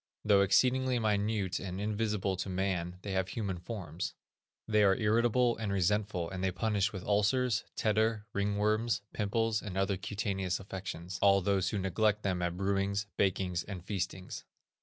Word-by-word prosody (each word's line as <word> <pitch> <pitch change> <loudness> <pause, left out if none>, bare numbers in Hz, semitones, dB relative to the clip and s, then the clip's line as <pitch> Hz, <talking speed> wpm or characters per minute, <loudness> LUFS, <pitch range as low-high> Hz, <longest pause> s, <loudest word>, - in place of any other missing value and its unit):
Though 100 -2 +5
exceedingly 130 +5 +3
minute 105 -3 0
and 95 0 -5
invisible 105 -2 -1
to 95 - -3
man 90 -2 -1
they 100 - -4
have 95 -1 0
human 95 -4 -3
forms. 90 -3 -5 0.5
They 105 -1 +3
are 100 -2 +5
irritable 120 +3 +3
and 110 -3 -3
resentful, 100 -1 0
and 95 +1 -5
they 95 - +2
punish 100 +1 0
with 95 -3 -6
ulcers, 110 +4 +2
tetter, 110 0 +1
ringworms, 105 +3 +1
pimples, 110 +1 0
and 95 -3 -6
other 95 0 +1
cutaneous 95 -2 -2
affections, 95 -2 -6
all 100 -1 +6
those 95 0 +1
who 105 - -2
neglect 105 +3 +1
them 95 -3 0
at 85 0 -1
brewings, 100 +1 0
bakings, 90 -2 0
and 95 -4 -7
feastings. 95 -2 -4
100 Hz, 155 wpm, -32 LUFS, 95-105 Hz, 0.5 s, all